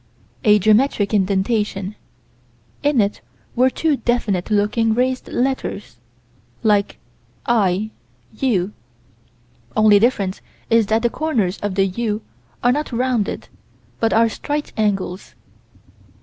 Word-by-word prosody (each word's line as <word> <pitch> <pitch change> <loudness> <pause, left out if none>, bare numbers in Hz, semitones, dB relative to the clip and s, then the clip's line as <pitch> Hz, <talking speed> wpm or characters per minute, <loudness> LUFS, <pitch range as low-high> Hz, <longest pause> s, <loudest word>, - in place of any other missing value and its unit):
A 210 -3 +6
geometric 215 0 +2
indentation: 200 0 0 0.9
in 290 -3 +2
it 205 -1 0 0.3
were 255 +2 +4
two 305 +2 0
definite 225 -7 -1
looking 215 +2 +2
raised 255 +1 0
letters, 245 - -2 0.7
like 205 -2 +2 0.5
"I 215 -2 +1 0.4
U": 210 -5 0 1.0
only 215 -1 +6
difference 200 -5 0 0.3
is 225 -2 +4
that 220 +2 +1
the 235 - +2
corners 225 - -1
of 205 -2 -3
the 195 0 +3
"U" 210 +2 -2 0.4
are 245 - +5
not 295 +2 -2
rounded, 245 -3 -1 0.5
but 225 - +1
are 230 +1 +4 0.2
right 295 0 -2
angles. 195 -4 -2
215 Hz, 110 wpm, -20 LUFS, 200-245 Hz, 1.0 s, A